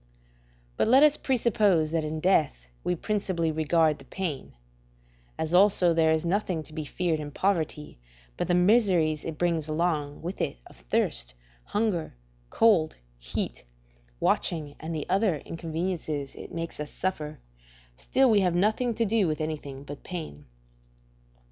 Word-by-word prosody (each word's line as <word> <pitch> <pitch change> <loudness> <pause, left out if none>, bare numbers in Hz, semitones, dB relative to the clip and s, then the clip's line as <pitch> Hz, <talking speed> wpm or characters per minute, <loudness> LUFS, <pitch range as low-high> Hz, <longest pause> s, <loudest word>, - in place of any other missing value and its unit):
But - - +2
let 260 +5 +7
us 300 -1 +6
presuppose 210 - +2
that 165 -1 0
in 155 +1 -3
death 155 - +2 0.2
we 180 - 0
principally 185 -4 -1
regard 155 0 +2
the 135 - -13
pain; 160 -4 -4 0.8
as 160 +1 -3
also 185 -2 +5
there 160 -1 +3
is 160 +1 +1
nothing 180 -3 0
to 155 - -13
be 155 -1 -4
feared 165 +1 -1
in 150 -1 -5
poverty 155 - -2 0.4
but - - -2
the 175 - +2
miseries 180 -6 +3
it 160 -2 -5
brings 165 -3 0
along 155 -2 -1
with 180 +3 -4
it - - -2
of - - -16
thirst, - - -1 0.3
hunger, 205 - -1 0.3
cold, 195 -9 +3 0.2
heat, - - -3 0.6
watching, 150 -4 0
and 160 +1 -5
the 150 - -4
other 195 -4 +2
inconveniences 160 -2 -4
it - - -10
makes 165 -2 -5
us 150 0 -4
suffer, 155 -5 -4 0.6
still 260 - +2
we 220 -4 +5
have 180 -3 +1
nothing 220 +5 +1
to 230 - +1
do 215 -2 +2
with 155 -1 -1
anything 145 -3 -5
but 145 0 -9
pain. 155 - -7
165 Hz, 150 wpm, -27 LUFS, 155-190 Hz, 0.8 s, let